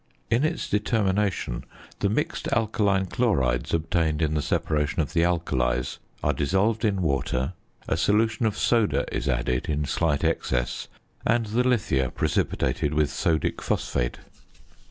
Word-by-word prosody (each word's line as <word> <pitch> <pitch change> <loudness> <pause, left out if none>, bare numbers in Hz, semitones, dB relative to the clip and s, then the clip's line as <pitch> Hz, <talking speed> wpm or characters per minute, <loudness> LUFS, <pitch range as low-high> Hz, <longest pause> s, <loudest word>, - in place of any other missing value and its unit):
In 115 +4 +3
its 155 +2 -1
determination 105 - 0 0.4
the 100 - +1
mixed 105 - -1
alkaline 105 -4 +2
chlorides 70 - +1
obtained 80 -1 +1
in 75 -1 +1
the 75 - +1
separation 75 +1 0
of 75 - -1
the 85 - +3
alkalies 65 -8 0 0.2
are - - +2
dissolved 100 - +1
in 100 -4 +1
water, 70 0 0 0.3
a - - +1
solution 110 +2 +2
of 105 -1 -2
soda 100 - +2
is 65 +2 -1
added 60 0 0
in 75 -1 0
slight 75 0 0
excess, 60 -1 -1 0.4
and 115 0 +2
the 115 +4 +1
lithia 100 - +1
precipitated 75 +3 0
with 75 -1 +2
sodic 80 -2 0
phosphate. - - -1
85 Hz, 135 wpm, -25 LUFS, 70-105 Hz, 0.4 s, In